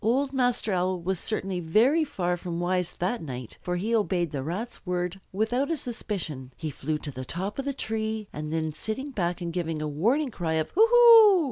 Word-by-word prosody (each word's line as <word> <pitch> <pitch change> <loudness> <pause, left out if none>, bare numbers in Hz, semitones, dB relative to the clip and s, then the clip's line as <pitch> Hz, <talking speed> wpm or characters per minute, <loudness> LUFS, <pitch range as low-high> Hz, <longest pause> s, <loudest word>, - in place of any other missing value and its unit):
Old 265 +5 +1
Master 245 -5 +1
Owl 185 0 0
was 185 +1 -1
certainly 195 -4 -2
very 230 - +3
far 180 -11 -1
from 175 -1 -5
wise 180 0 0
that 195 +7 -2
night, 125 -6 -7
for 180 - -2
he 215 +6 0
obeyed 180 -7 +1
the 140 - -3
Rat's 185 - -5
word 180 0 -2
without 230 +8 0
a 330 - 0
suspicion. 180 - -5
He 155 -2 -4
flew 150 +3 -2
to 150 - -7
the 130 -1 -6
top 190 - -4
of 275 - -2
the 280 - 0
tree, 220 -2 -3
and 150 +1 -5
then, 160 -1 -1
sitting 240 - -4
back 180 -6 -2
and 170 -1 -3
giving 165 -3 -2
a 155 - -2
warning 235 - +1
cry 170 -6 -2
of 160 -1 -1
"Hoo 440 +4 +5
hoo!" 460 -4 +8
185 Hz, 210 wpm, -27 LUFS, 165-240 Hz, -, hoo